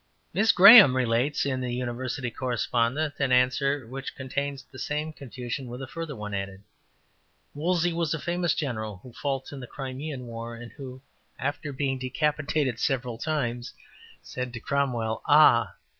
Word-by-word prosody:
'' - - -42
Miss 220 +2 +4
Graham 200 - +10
relates 125 +4 +1
in 130 -2 -1
the 125 -1 -3
University 125 +1 -3
Correspondent 125 +4 -1
an 135 -2 +1
answer 130 +2 +2
which 135 +3 -7
contains 140 +1 -4
the 130 - -14
same 150 +1 -3
confusion 130 -2 -6
with 120 +1 -7
a 135 - -5
further 160 +2 -6
one 105 -1 -6
added: 95 0 -5 0.9
``Wolsey 175 +2 +1
was 165 -2 -1
a - - -3
famous 175 0 0
general 110 - -3
who 125 - -12
fought 135 0 -3
in 140 - -7
the 125 - -8
Crimean 135 0 -6
War, 115 0 -7
and 120 0 -10
who, 130 -2 -10 0.3
after 145 +2 -3
being 135 -1 -2
decapitated 140 -1 -1
several 125 -4 -1
times, 125 -6 -2 0.5
said 125 -1 -5
to 115 - -5
Cromwell, 120 -5 -1
Ah! 145 -6 +5
130 Hz, 160 wpm, -27 LUFS, 120-145 Hz, 0.9 s, Graham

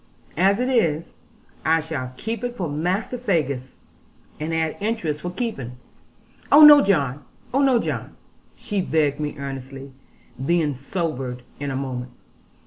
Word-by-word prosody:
As 195 +3 +4
it 250 - +1
is, 165 - +1 0.5
I 160 +1 +3
shall 140 -5 -5
keep 225 +2 -4
it 245 0 -3
for 185 -7 -2
Master 180 +11 -2
Faggus, 140 - -1 0.6
and 155 +2 -3
add 160 -1 0
interest 200 -9 -2
for 175 - -3
keeping.' 175 - -4 0.8
'Oh 295 +2 +9
no, 295 -1 +10
John; 145 -8 +1 0.3
oh 275 - +3
no, 265 -3 +4
John,' - - -3 0.4
she 205 -3 -2
begged 150 -5 +1
me 150 -1 -3
earnestly, 135 0 -7 0.5
being 160 -1 +2
sobered 135 -3 -4 0.2
in 145 0 -3
a 135 - -3
moment. 130 -2 -4
160 Hz, 140 wpm, -23 LUFS, 135-200 Hz, 0.8 s, no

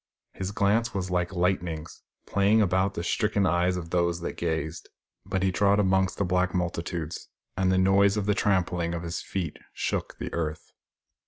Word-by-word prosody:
His 95 -1 -4
glance 110 +4 +1
was 95 -1 -2
like 90 0 0
lightnings, 90 -3 -1 0.2
playing 100 +2 +3
about 95 -1 +2
the 85 - -3
stricken 100 +3 +1
eyes 90 +1 +2
of 85 -1 -7
those 85 -1 +1
that - - -4
gazed. 80 -1 -3 0.4
But 95 0 -1
he 95 - +2
trod 100 +2 +3
among 95 -1 +3
the 100 - +1
black 90 +1 +1
multitudes, 85 -2 -3 0.3
and 95 0 +2
the 95 - +3
noise 100 +2 +4
of 105 - -1
the 105 - +3
trampling 90 -4 +1
of 85 - -4
his 85 0 -4
feet 90 -5 -4
shook - - -3
the - - -6
earth. 80 -2 -3
90 Hz, 175 wpm, -27 LUFS, 85-100 Hz, 0.4 s, noise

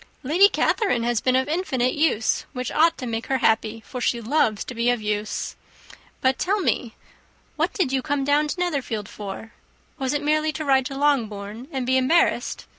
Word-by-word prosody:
"Lady 350 +9 +5
Catherine 390 - +1
has 240 -1 0
been 255 -2 +2
of 260 +1 +2
infinite 295 -7 0
use, 295 -8 +1
which 250 -2 -4
ought 330 +2 +3
to 255 - -5
make 230 -1 -4
her 265 - +1
happy, 225 -1 +1
for 250 - -6
she 240 - +1
loves 230 -3 +1
to - - -7
be 235 +1 +1
of 245 -1 +1
use. 210 0 -3 0.7
But 260 0 +2
tell 405 +3 +1
me, 245 - -1 0.6
what - - 0
did 345 -10 0
you 265 -1 +1
come 285 0 -1
down 290 +2 +2
to 325 - -4
Netherfield 275 - -2
for? 205 +2 -8 0.5
Was 265 0 -1
it 290 - -1
merely 310 +1 +1
to 310 - -4
ride 265 -1 +3
to 275 -2 -7
Longbourn 230 -5 -1
and 265 -4 -2
be 260 +1 +2
embarrassed? 260 +7 +1
260 Hz, 190 wpm, -23 LUFS, 230-300 Hz, 0.7 s, Lady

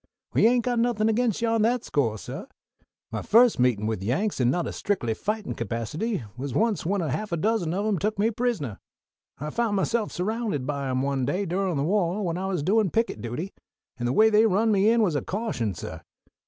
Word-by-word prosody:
"We - - +5
ain't 240 0 +2
got 245 -2 +1
anything 230 -2 +2
against 230 -1 +1
you 230 - +2
on 225 -1 +2
that 235 +2 +2
score, 115 -7 0
suh. - - -7 0.6
My - - -3
first 235 - +5
meetin' 120 -4 +2
with 110 -3 -2
Yanks 135 - -1
in 120 - +3
a - - +4
not 175 +3 -1
strictly 155 - -1
fightin' 210 - -3
capacity 115 - -3
was 130 +1 -5
once 220 +1 +1
when 195 +3 0
a 155 - -2
half 210 +9 -3
a 170 - 0
dozen 190 -2 0
of 200 +2 -1
'em 210 -5 +1
took 210 +3 -1
me 215 +3 +2
prisoner. 210 - -2 0.6
I 150 +2 -5
found 230 0 0
myself 215 +3 0
surrounded 205 - -2
by 140 -1 -2
'em 130 0 0
one 140 -1 0
day 195 +9 -1
durin' 185 -1 -1
the 140 - 0
wah 185 +2 +1
when 175 -2 -2
I 190 - -2
was 180 -6 -1
doin' 205 +3 +3
picket 225 - -1
duty, 125 - -5 0.5
and 120 - -1
the 125 - 0
way 220 +6 +5
they 215 +1 +5
run 220 +3 +2
me 200 +1 +4
in 230 0 +4
was 180 -6 +1
a 145 - +1
caution, 185 - -2
suh. - - -7
195 Hz, 220 wpm, -26 LUFS, 140-220 Hz, 0.6 s, We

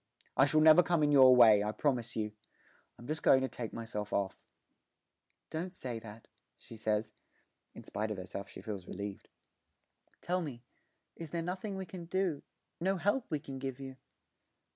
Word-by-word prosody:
I 135 - +5
shall 155 +2 +3
never 160 +2 +8
come 170 -2 +1
in 145 - +3
your 130 -3 +8
way, 110 -4 +7
I 105 - -1
promise 125 -1 -1
you. 105 -1 -2 0.7
I'm 120 - -12
just 155 +3 -3
going 130 - +5
to 130 - 0
take 120 -3 -6
myself 110 -3 -5
off.' 100 -1 -2 1.1
'Don't 170 +4 -3
say 125 -9 -5
that,' 110 0 -12 0.3
she - - -13
says 110 0 -1 0.6
(in - - -10
spite 110 +1 -3
of 105 - -4
herself 95 +2 -7
she - - -11
feels 100 -5 -6
relieved); 100 0 -7 0.9
'tell 180 +1 -1
me 130 -7 -7 0.5
is 165 -2 -8
there 170 +2 -3
nothing 190 +4 -4
we 190 - -4
can 175 0 -8
do 180 -3 -1 0.4
no 190 +3 +1
help 205 +8 0
we 155 - 0
can 135 -3 -8
give 135 -1 -5
you?' 135 -1 -8
130 Hz, 175 wpm, -33 LUFS, 110-165 Hz, 1.1 s, never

